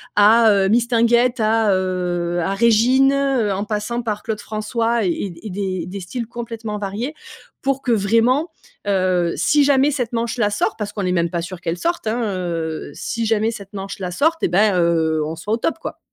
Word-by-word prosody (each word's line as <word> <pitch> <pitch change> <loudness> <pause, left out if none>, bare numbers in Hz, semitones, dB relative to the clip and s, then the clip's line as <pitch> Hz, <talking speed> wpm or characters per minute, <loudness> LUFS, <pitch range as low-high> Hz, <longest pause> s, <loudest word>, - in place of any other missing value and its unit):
à, 220 +2 +6
heu, 195 -2 +3
Mistinguett, 235 +1 +3
à, 215 -2 +3
heu 175 -2 -1
à 190 +4 -1
Régine, 235 +5 +4
heu, 270 -7 +1
en 200 +2 -3
passant 215 +3 -2
par 210 -3 -3
Claude 220 -2 -3
François 225 +2 -1
et 180 +1 -2
et 215 - -6
des 185 -3 -3
des 195 +2 -6
styles 225 +6 -5
complètement 230 -3 -6
variés, 210 +8 -4 0.5
pour 270 0 0
que, 245 - -1
vraiment, 230 - +2 0.4
heu, 185 -3 +1
si 290 -1 +3
jamais 280 +1 +4
cette 250 -4 -3
manche-là 230 -2 0
sort, 205 - -1
parce 210 -2 -4
qu'on 205 - -3
n'est 180 - 0
même 170 -2 +1
pas 170 0 -2
sûr 175 +1 -7
qu'elle 175 0 -3
sorte, 340 - -2
hein, 230 +2 0
heu, 165 -4 -4
si 230 -1 -3
jamais 220 +1 +1
cette 200 -1 -10
manche-là 195 -2 -5
sorte, 320 - +1
eh - - +4
ben, 190 +1 +3
heu, 160 -2 +2
on 160 +1 -4
soit 185 +6 -6
au 225 - +2
top, 325 - -1
quoi. - - -6
210 Hz, 195 wpm, -20 LUFS, 185-235 Hz, 0.5 s, à